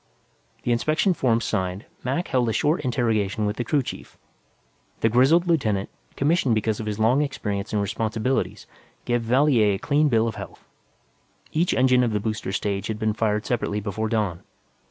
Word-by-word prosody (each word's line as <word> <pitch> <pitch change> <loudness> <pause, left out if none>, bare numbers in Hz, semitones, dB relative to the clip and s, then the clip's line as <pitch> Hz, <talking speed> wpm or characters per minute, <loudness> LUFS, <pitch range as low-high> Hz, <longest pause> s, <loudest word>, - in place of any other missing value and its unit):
The 120 - 0
inspection 155 - +2
forms 115 -7 +1
signed, 95 0 -2 0.2
Mac 135 +8 -2
held 125 -3 +1
a - - 0
short 150 +9 +1
interrogation 110 -5 0
with 105 +1 -2
the 120 - -1
crew 140 +3 +1
chief. - - -8 0.8
The 115 - +3
grizzled 135 +9 +4
lieutenant, 110 - 0 0.3
commissioned 140 -5 +2
because 110 0 -1
of 110 - -5
his 105 -1 -2
long 115 +6 +3
experience 105 -8 -3
and 105 - 0
responsibilities, 110 +5 -1 0.4
gave 120 0 +1
Valier 120 -4 +3
a - - -3
clean 145 +7 +2
bill 115 -2 +2
of 115 - -2
health. - - -10 0.9
Each 170 +3 +1
engine 130 -1 +4
of 115 -3 0
the 105 - +1
booster 110 -2 -3
stage 100 0 -2
had 110 - -3
been 110 0 0
fired 105 -1 0
separately, 110 -4 -1
before 110 +1 -3
dawn. 105 -7 -1
115 Hz, 175 wpm, -24 LUFS, 105-130 Hz, 0.9 s, grizzled